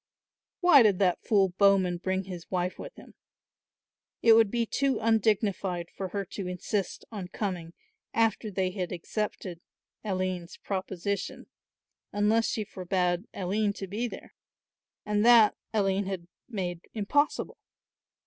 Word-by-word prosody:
Why 355 -7 +8
did 210 -5 +4
that 180 -2 +2
fool 195 -3 +3
Bowman 195 -3 +4
bring 190 +2 -1
his 180 -3 -8
wife 180 0 -2
with - - -8
him? - - -14 1.1
It 230 - +8
would 225 -2 +6
be 235 +1 0
too 275 +3 0
undignified 205 -5 +1
for 190 - -3
her 200 +2 -3
to 185 +1 -6
insist 185 +2 -3
on 200 -5 -5
coming 180 -3 -4 0.4
after 225 -1 +1
they 185 -2 -1
had 180 -3 -4
accepted 180 -1 -4 0.4
Aline's 185 -3 -3
proposition, 195 0 -3 0.7
unless 215 +2 +2
she 215 - -1
forbade 180 -1 -1
Aline 200 +2 0
to 200 - -6
be 210 +6 -2
there; - - -10 0.7
and 210 0 +1
that 230 -3 +7 0.2
Aline 195 -2 +1
had 190 -3 -4 0.2
made 180 -6 -3
impossible. 285 +8 0
195 Hz, 130 wpm, -28 LUFS, 180-215 Hz, 1.1 s, Why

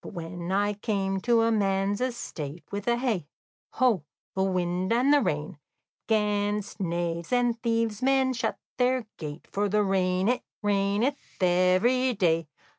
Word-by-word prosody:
"But - - -9
when 170 0 -5
I 205 +2 +2
came 195 -2 -1
to 230 0 +3
man's 200 0 +1
estate, 170 - -4
With 200 0 -4
hey, 235 - 0 0.5
ho, 240 - +2 0.3
the 190 - -1
wind 185 0 0
and 250 +5 +4
the 290 - +5
rain, 150 - -2 0.5
'Gainst 210 -1 0
knaves 170 -2 -2
and 245 -2 +1
thieves 230 -3 0
men 265 0 +3
shut 235 - -2 0.2
their 250 -1 +2
gate, 150 0 -7
For 205 +1 0
the 210 +1 +2
rain 185 -1 +1
it 245 +2 +1 0.2
raineth 205 +7 +1 0.3
every 185 +9 +3
day. 165 -4 +2
205 Hz, 140 wpm, -27 LUFS, 180-235 Hz, 0.5 s, the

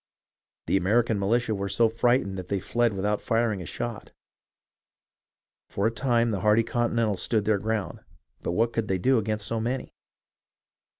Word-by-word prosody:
The - - +2
American 110 +3 +2
militia 115 +3 +1
were 100 -1 -3
so 115 +4 +3
frightened 115 -3 +1
that 90 - -7
they 100 0 -1
fled 120 +3 0
without 100 +2 -1
firing 115 -4 0
a 85 - -7
shot. 120 +4 -5 1.6
For 100 - -2
a 115 - +3
time 120 -1 +1
the 100 - -1
hardy 105 +3 +3
Continentals 115 -3 0
stood 110 -3 +1
their 105 -2 +2
ground, 110 -1 -3 0.4
but - - -2
what 115 +5 +1
could 115 -2 -1
they 95 - 0
do 130 +6 +3
against 110 -1 -2
so 115 - -1
many 125 +3 -3
110 Hz, 165 wpm, -26 LUFS, 100-120 Hz, 1.6 s, so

